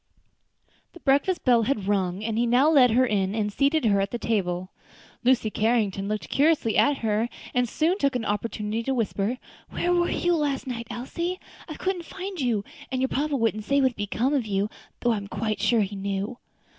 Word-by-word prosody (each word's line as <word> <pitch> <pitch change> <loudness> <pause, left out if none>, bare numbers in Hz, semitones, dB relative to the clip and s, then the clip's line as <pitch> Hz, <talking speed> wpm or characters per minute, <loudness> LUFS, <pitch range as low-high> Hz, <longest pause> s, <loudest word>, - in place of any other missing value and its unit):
The 345 - -12
breakfast 285 +6 +1
bell 245 -3 +5
had 215 -4 -1
rung, 195 -1 0
and 225 0 -2
he 235 +2 +1
now 250 +5 +4
led 265 -5 +6
her 250 +3 +4
in 200 -3 0
and 210 -2 -1
seated 285 +3 +2
her 200 -2 +3
at 195 - -1
the 240 - -3
table. 185 -5 -1 0.5
Lucy 245 -3 +3
Carrington 210 -4 +1
looked 215 0 -3
curiously 285 -6 +2
at 285 -1 +4
her, 220 +2 +1 0.2
and 250 -1 +1
soon 335 - +1
took 275 -2 +1
an 235 -3 -1
opportunity 210 +1 -2
to 265 +3 -1
whisper, 225 0 -1 0.3
"Where 355 - 0
were 345 0 +2
you 350 0 +1
last 290 -4 -1
night, 235 -3 -5
Elsie? 340 +10 -4 0.3
I 310 - -5
couldn't 365 -1 -2
find 375 -2 -6
you, 230 -6 0 0.3
and 260 - -1
your 265 0 +1
papa 290 +1 0
wouldn't 225 -4 0
say 280 +3 +2
what 265 -1 +4
had - - -22
become 220 +6 -1
of 260 -6 0
you, 200 +1 -1 0.3
though 240 - +2
I 225 - +1
am 200 -1 -6
quite 215 0 -2
sure 225 +1 +3
he 200 0 -2
knew." 200 +4 -3
235 Hz, 205 wpm, -25 LUFS, 210-275 Hz, 0.5 s, led